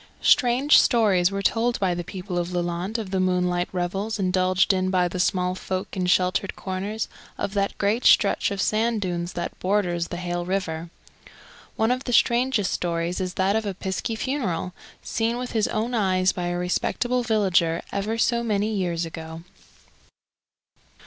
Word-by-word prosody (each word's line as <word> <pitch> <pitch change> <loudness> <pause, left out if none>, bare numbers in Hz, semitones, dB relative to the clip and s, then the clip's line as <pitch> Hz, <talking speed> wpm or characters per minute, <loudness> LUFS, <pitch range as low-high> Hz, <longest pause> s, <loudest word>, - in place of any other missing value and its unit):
Strange 260 +2 +5
stories 200 -7 +3
were 200 0 -3
told 235 +4 +1
by 185 -3 +1
the 175 0 -3
people 180 0 -4
of 175 +1 -3
Lelant 175 +4 -2
of 210 -4 -5
the 190 - 0
moonlight 180 -1 +1
revels 195 +4 -2
indulged 185 0 +2
in 185 0 0
by 180 -1 +2
the 180 +1 -5
small 180 0 +1
folk 185 0 -4
in 185 -1 -1
sheltered 185 +2 +1
corners 200 +3 -4 0.3
of 195 - -3
that 200 -1 -1
great 210 +4 0
stretch 200 - +4
of 200 - -4
sand 225 +1 +1
dunes 175 -2 -3
that 175 - -5
borders 180 -3 0
the 175 - -6
Hayle 175 0 -3
river. 175 -3 -3 0.9
One 220 +2 +2
of 255 +2 -1
the 245 - -2
strangest 235 -3 +3
stories 170 +1 -2
is 185 -1 -3
that 190 +2 +1
of 220 - +1
a 195 - -3
piskie 190 +4 -3
funeral, 205 - -2 0.3
seen 230 +1 -1
with 250 0 -5
his 220 -2 +1
own 230 +3 -2
eyes 185 -4 +2
by 175 -1 -4
a 175 0 -2
respectable 240 +7 0
villager 190 -7 +1
ever 210 +3 -2
so 235 +1 +2
many 215 -1 0
years 175 -4 -1
ago. 160 0 -8
190 Hz, 170 wpm, -24 LUFS, 180-220 Hz, 0.9 s, Strange